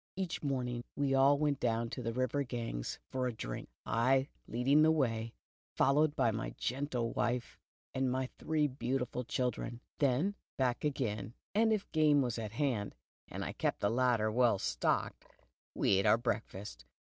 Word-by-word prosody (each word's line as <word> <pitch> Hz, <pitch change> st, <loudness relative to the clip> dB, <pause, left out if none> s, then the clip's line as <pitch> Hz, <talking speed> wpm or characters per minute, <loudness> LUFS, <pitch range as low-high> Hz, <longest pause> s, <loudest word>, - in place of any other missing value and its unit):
" -, -, -76 dB
Each 185 Hz, -3 st, -3 dB
morning 125 Hz, -4 st, -2 dB
we 140 Hz, -1 st, +1 dB
all 135 Hz, +1 st, +5 dB
went 145 Hz, -2 st, +1 dB
down 115 Hz, -1 st, 0 dB
to 130 Hz, -, -4 dB
the 115 Hz, -1 st, -2 dB
river 130 Hz, +3 st, 0 dB
Ganges 115 Hz, -, -4 dB
for 130 Hz, -1 st, 0 dB
a -, -, -1 dB
drink, -, -, -6 dB, 0.2 s
I 130 Hz, +4 st, +2 dB, 0.2 s
leading 135 Hz, +6 st, +3 dB
the 155 Hz, -, +6 dB
way, 115 Hz, -7 st, 0 dB, 0.4 s
followed 145 Hz, +3 st, +3 dB
by 115 Hz, -, +3 dB
my 110 Hz, +1 st, -4 dB
gentle 125 Hz, -3 st, -1 dB
wife 120 Hz, 0 st, -1 dB, 0.3 s
and 130 Hz, -1 st, +1 dB
my 130 Hz, +1 st, 0 dB
three 155 Hz, -1 st, +1 dB
beautiful 125 Hz, -1 st, -2 dB
children. 120 Hz, -1 st, -2 dB, 0.2 s
Then 145 Hz, +8 st, +2 dB, 0.2 s
back 125 Hz, -2 st, 0 dB
again, 120 Hz, -7 st, -2 dB, 0.2 s
and 220 Hz, +2 st, +4 dB
if 215 Hz, -2 st, 0 dB
game 150 Hz, -3 st, +4 dB
was 120 Hz, -2 st, -2 dB
at 110 Hz, -2 st, -5 dB
hand, 120 Hz, -7 st, -1 dB, 0.3 s
and -, -, -5 dB
I -, -, -3 dB
kept -, -, -1 dB
the 100 Hz, -, +2 dB
larder 120 Hz, -3 st, +2 dB
well 120 Hz, -2 st, +4 dB
stocked, -, -, -1 dB, 0.5 s
we 95 Hz, -, +3 dB
ate 95 Hz, -, +2 dB
our -, -, +6 dB
breakfast. 105 Hz, -, -4 dB
125 Hz, 170 wpm, -33 LUFS, 115-140 Hz, 0.5 s, the